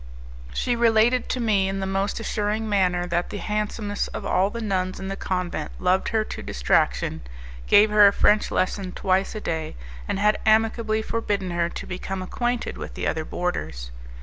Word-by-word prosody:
She 245 - 0
related 235 +1 +3
to 255 - -1
me 205 -5 +2
in 195 0 -3
the 190 - -2
most 195 +2 -1
assuring 215 0 -1
manner 180 -4 +1
that 175 0 -1
the - - -5
handsomest 210 +1 -2
of - - -5
all 190 +2 +2
the 235 - -6
nuns 185 -4 -1
in 190 0 -5
the 195 - -3
convent 180 -5 -3
loved 185 +1 +1
her 220 -1 +1
to - - -7
distraction, - - 0 0.5
gave 210 +1 +6
her 210 -1 +8
a - - +5
French 210 +1 +3
lesson 185 0 -1
twice 190 +2 0
a 215 - -4
day, 160 -4 -3 0.3
and - - -1
had 210 +2 +2
amicably 220 0 +2
forbidden 205 -5 -2
her 170 0 0
to - - -7
become 185 +1 -5
acquainted 240 +5 -2
with - - -7
the - - -3
other 160 - -1
boarders. 75 - -4
200 Hz, 180 wpm, -24 LUFS, 185-215 Hz, 0.5 s, her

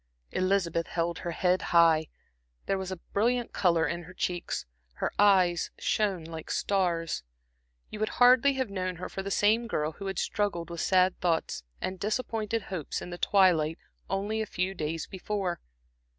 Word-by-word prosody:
Elizabeth 185 -3 +1
held 170 0 -2
her 175 - -4
head 180 +1 +1
high, 165 -2 +4 0.6
there 195 - 0
was 190 0 -4
a 185 - -4 0.2
brilliant 240 +3 +1
color 170 -3 +3
in 170 +2 -3
her 185 +2 -13
cheeks, 175 -2 -2 0.3
her - - -2
eyes 185 -4 +4
shone 195 -6 0
like 160 -1 -8
stars. 175 - 0 0.7
You 215 - -6
would 215 - 0
hardly 255 +3 +6
have 260 -5 -2
known 185 -1 -2
her 180 - -6
for 195 - -4
the 195 - -4
same 220 +4 +3
girl 155 -8 -1
who 195 +5 -7
had 195 -2 -3
struggled 175 -5 -1
with 170 - -4
sad 185 -1 +3
thoughts 170 -2 0 0.2
and 185 0 -4
disappointed 220 0 -1
hopes 180 -7 -4
in 180 - -8
the 175 - -6
twilight 170 -5 +3 0.3
only 205 +3 -1
a 220 - -3
few 185 +1 -2
days 160 -2 -3
before. 190 -2 -3
185 Hz, 165 wpm, -29 LUFS, 170-205 Hz, 0.7 s, hardly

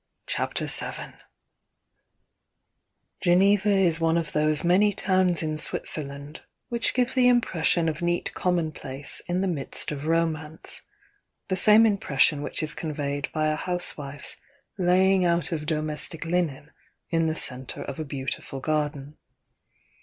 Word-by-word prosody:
m - - -54
CHAPTER - - -2
VII - - -1 2.1
Geneva 195 +3 +4
is 185 -5 +3
one 165 0 +2
of 165 -2 -2
those 150 0 +1
many 195 +4 +4
towns 185 -3 +2
in 155 -1 -1
Switzer 155 - 0
land 140 +1 -9 0.3
which 235 -1 0
give 250 0 +1
the 255 -1 +4
impression 175 -8 +2
of 160 +1 -2
neat 175 0 -1
commonplace 155 -6 -3
in 180 +1 0
the 195 - 0
midst 155 -5 -2
of 150 +1 -5
romance, 160 -1 -1 0.3
— 410 - -46
the 185 - +1
same 215 +4 +6
impression 150 -8 +2
which 145 - -3
is 150 - +1
conveyed 145 -3 -3
by 155 -1 0
a 155 0 +1
housewife's 150 -5 -2 0.4
laying 185 0 +3
out 170 0 +1
of 155 -2 -3
domestic 155 +1 -2
linen 165 -5 -1 0.4
in 165 -1 +2
the 160 - -1
centre 130 -4 -2
of 140 +2 -7
a - - -1
beautiful 135 -1 -5
garden. 150 0 -2
165 Hz, 140 wpm, -26 LUFS, 150-180 Hz, 2.1 s, same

